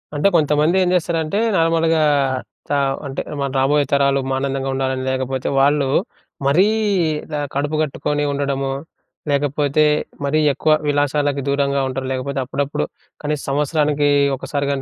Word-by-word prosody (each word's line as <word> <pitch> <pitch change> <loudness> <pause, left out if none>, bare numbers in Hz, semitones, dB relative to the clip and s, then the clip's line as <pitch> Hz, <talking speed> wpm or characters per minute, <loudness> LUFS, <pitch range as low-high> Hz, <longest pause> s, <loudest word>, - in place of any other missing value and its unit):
అంటే, 145 +7 +3
కొంతమంది 150 +2 +3
ఏం 180 - +1
చేస్తారంటే, 165 +2 0 0.2
నార్మల్‌గా 165 -1 +2 0.7
చ - - -6 0.4
అంటే, 135 - -4 0.2
మనం 140 -1 -1
రాబోయే 145 +2 +3
తరాలు 140 0 +3
ఆనందంగుండాలని, 135 -1 -1
లేకపోతే 130 0 -2
వాళ్ళు 140 0 +3 0.6
మరీ 180 +9 +4 0.6
ఇలా 150 -2 -4 0.2
కడుపు 145 +2 -1
కట్టుకొని 150 0 -1
ఉండడము, 140 -1 -1 0.6
లేకపోతే 145 +1 +1 0.4
మరీ 155 +2 +1
ఎక్కువ 155 - +1 0.2
విలాసాలకు 145 -1 +1
దూరంగా 140 0 +1
ఉంటారు, 130 0 -4
లేకపోతే 135 +1 -3
అప్పుడప్పుడు 140 +2 -2 0.4
కనీస 150 -1 -2
సంవత్సరానకీ 145 0 +1 0.3
ఒక్కసారి 140 +1 -3
గానీ, 135 -1 -2
145 Hz, 120 wpm, -20 LUFS, 135-150 Hz, 0.7 s, మరీ